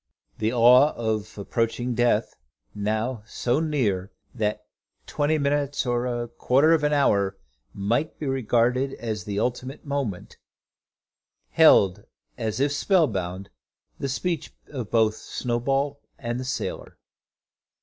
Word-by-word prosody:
The 110 +1 +1
awe 125 +4 +6
of 110 -2 -3
approaching 115 +4 -1
death, 120 -2 +1 0.4
now 110 +3 -2
so 120 +5 0
near, 110 - 0 0.2
that 105 -2 -2 0.4
twenty 150 +2 0
minutes 145 -1 0
or 120 0 0
a 120 -1 -2
quarter 135 +6 +3
of 160 -2 +2
an 150 - +2
hour 100 -9 +2 0.3
might 115 +10 -1
be 155 - -5
regarded 130 0 +1
as 110 -3 -4
the 100 -1 -4
ultimate 125 +5 -3
moment, 140 -10 -4 1.1
held, 100 - +5 0.3
as 110 -1 -3
if 140 +1 +2
spellbound, 100 - 0 0.5
the 140 - -2
speech 165 +4 -2 0.2
both 125 -7 -5 0.2
of - - -12
Snowball 135 +4 -2 0.2
and 120 0 -3
the 130 - -5
sailor. 135 - -4
120 Hz, 120 wpm, -25 LUFS, 110-140 Hz, 1.1 s, awe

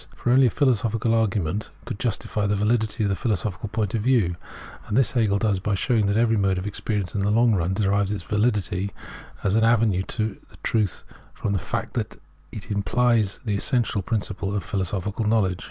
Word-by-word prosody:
For 120 - -1
only 130 +1 +6
a - - +3
philosophical 115 -3 +1
argument 105 -3 0 0.2
could 100 - -5
justify 105 -3 -1
the 105 - +1
validity 110 +1 +1
of 100 - +1
the 100 - +1
philosophical 105 -1 -2
point 105 -2 -2
of 115 - 0
view; 110 -8 +2 0.5
and 105 - 0
th..s 135 - +3
Hegel 110 -5 +2
does 100 -2 +1
by 105 +1 -1
showing 110 +1 +1
that 100 +1 +1
every 115 -1 +3
mode 95 -2 +2
of 90 - -4
experience 105 -2 -3
in 100 - -1
the 100 - +1
long 115 +2 +4
run 90 -1 0
derives 100 0 +1
its 100 -4 -3
vahdity 105 -2 0 0.5
as 100 - +1
an 110 +1 +3
avenue 115 -5 +3
to 110 +1 -3 0.3
truth 105 -6 0 0.3
from 100 - -2
the 100 - +1
fact - - -4
that - - -4 0.3
it 105 - -8
implies 105 +1 +2
the 105 - 0
essential 115 0 0
principle 100 -1 -2
of 100 - -1
philosophical 100 +1 -2
knowledge. 100 -5 +2
105 Hz, 190 wpm, -24 LUFS, 100-115 Hz, 0.5 s, only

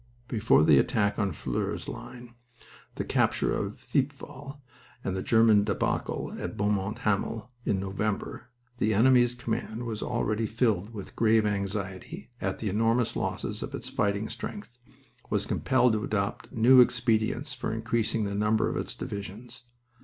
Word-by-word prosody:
Before 110 - +3
the 75 -3 +6
attack 100 +7 +1
on 100 - +2
the 95 - -4
Flers 65 -4 -3
line, 120 -1 -9 0.6
the - - -2
capture - - +1
of - - -3
Thiepval, 140 +1 -3 0.4
and 95 - -2
the 95 - -2
German 110 -2 +5
debacle - - -1
at - - -5
Beaumont 100 0 0
Hamel, 110 +2 -1
in 95 - +1
November, 100 +5 -3 0.3
the 110 -1 +2
enemy's 120 +1 +5
command 120 -1 -3
was 110 -3 -4
already 110 +1 -1
filled 110 -3 0
with 105 -4 -7
a - - -20
grave 110 -1 +3
anxiety 100 - -3
at 95 -1 -1
the 110 - -4
enormous 115 +4 +1
losses - - -2
of - - -5
its - - -6
fighting 100 +1 0
strength; 205 -8 -6 0.6
was - - 0
compelled 125 -2 +2
to 105 -1 -1
adopt 100 -2 -2
new 125 +3 +7
expedients 120 +2 +1
for 125 - -3
increasing 115 0 0
the 100 -1 -2
number 105 +2 +2
of - - -2
its - - -4
divisions. 110 +5 -7
110 Hz, 155 wpm, -28 LUFS, 100-120 Hz, 0.6 s, new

